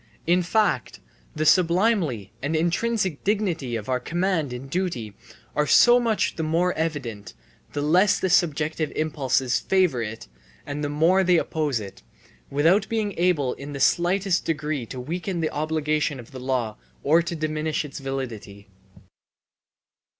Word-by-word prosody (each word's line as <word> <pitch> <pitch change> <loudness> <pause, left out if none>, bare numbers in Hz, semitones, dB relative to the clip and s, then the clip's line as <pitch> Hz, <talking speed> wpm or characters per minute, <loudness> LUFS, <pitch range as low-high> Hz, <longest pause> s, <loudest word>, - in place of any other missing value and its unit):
In 175 +2 +3
fact, 210 +4 0 0.4
the 155 0 -1
sublimity 170 - +2
and 145 +4 -1
intrinsic 180 +1 0
dignity 180 - -1
of 110 -2 -4
the 130 +1 0
command 170 0 -1
in 125 +2 -6
duty 135 - -3 0.4
are 150 - +1
so 240 +9 +6
much 230 -3 0
the - - -2
more 170 +3 +1
evident, 130 - -4 0.4
the 145 - -2
less 185 +7 +4
the - - 0
subjective 155 -3 +1
impulses 135 -5 0
favour 185 -10 +2
it 115 0 -6 0.4
and 145 +1 -4
the 145 - -1
more 165 +6 +3
they 180 -1 +4
oppose 150 -6 -1
it, 100 -2 -9 0.5
without 165 +9 +3
being 215 -3 -1
able 160 -8 +2
in 145 +1 -8
the 140 - -5
slightest 180 +5 +2
degree 150 -5 -2
to 130 - -7
weaken 175 +7 -3
the 160 -1 -1
obligation 155 -2 -1
of 120 - -12
the 130 - -8
law 125 -4 -2 0.3
or 160 +4 +4
to 170 0 -4
diminish 155 0 -2
its 145 - -8
validity. 115 -7 -6
155 Hz, 150 wpm, -24 LUFS, 135-180 Hz, 0.5 s, so